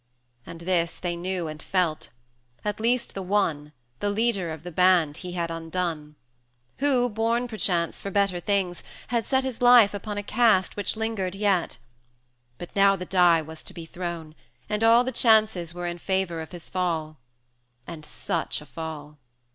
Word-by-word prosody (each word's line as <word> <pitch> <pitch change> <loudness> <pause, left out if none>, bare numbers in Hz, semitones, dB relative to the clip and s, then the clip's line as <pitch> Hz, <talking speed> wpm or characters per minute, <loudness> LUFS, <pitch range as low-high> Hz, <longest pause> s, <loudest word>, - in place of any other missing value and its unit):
270 - - -9
And 170 +1 -10 0.2
this - - -10
they 175 -1 -2
knew 180 -1 -3
and 155 0 -7
felt, 175 -5 -1 0.6
at 210 0 -2
least 235 +2 +1
the 195 - -4
one, 175 -7 0 0.3
The 205 - 0
leader 205 -4 0
of 160 -1 -7
the 175 - -7
band 175 -3 +3
he 180 0 -7
had 170 -2 -2
undone; 165 -2 -4 0.6
Who, 260 -3 +3
born 230 +2 0
perchance 180 -7 -1
for 200 - -4
better 195 -2 +1
things, 185 -2 -1 0.3
had 235 -2 0
set 265 -1 +2
His 260 -3 -4
life 245 -4 +7
upon 205 +1 -5
a 205 - -2
cast 215 -4 +3
which 205 - -2
lingered 215 -4 -2
yet: 195 -4 +1 0.8
But 175 - -9
now 195 0 +5
the 180 -1 -6
die 175 -3 +4
was 160 +1 -10
to - - -9
be 165 - -7
thrown, 170 -2 -6 0.3
and 210 +1 -1
all 230 +2 +6
The 260 - -2
chances 215 -9 +3
were 175 +1 -6
in 175 0 -4
favour 190 -3 -1
of 160 - -9
his 175 -2 -8
fall: 160 -5 -2 0.7
And 165 -3 -8
such - - -2
a - - -12
fall! 150 -2 -8
185 Hz, 175 wpm, -26 LUFS, 170-210 Hz, 0.8 s, life